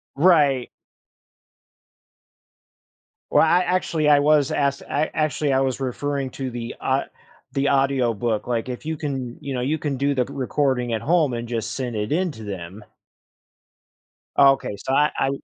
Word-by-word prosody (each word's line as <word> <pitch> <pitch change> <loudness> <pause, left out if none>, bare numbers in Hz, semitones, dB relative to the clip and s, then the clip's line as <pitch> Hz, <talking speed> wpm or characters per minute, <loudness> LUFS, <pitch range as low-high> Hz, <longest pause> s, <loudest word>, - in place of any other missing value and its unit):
Right. 145 -5 +4 2.6
Well, - - +5
I 170 +2 +4
actually, 170 -4 +1
I 145 -1 +6
was 145 -1 +3
ask 140 -1 0
I 150 +2 0
actually, 150 -2 0
I 130 - +3
was 130 -1 -1
referring 135 +1 -2
to 135 0 -4
the 120 -1 -6
a 135 +1 +1 0.5
the 140 +1 0
audio 135 -3 +2
book, 110 0 -2
like, 120 0 -2
if 125 +3 -6
you 160 - -2
can, 135 -5 -4
you 140 -1 -5
know, 125 - -2
you 145 +5 0
can 145 -3 -3
do 140 +2 +1
the 125 -2 +1
recording 130 -2 -1
at 110 - -1
home 160 -3 +2
and 120 0 -4
just 115 -2 -3
send 125 -3 -4
it 105 0 -3
into 160 -8 -1
them. 95 0 -7 1.5
Okay. 135 -6 +4
So 130 - -3
I 150 +2 +3
I 135 - +1
135 Hz, 160 wpm, -23 LUFS, 120-145 Hz, 2.6 s, I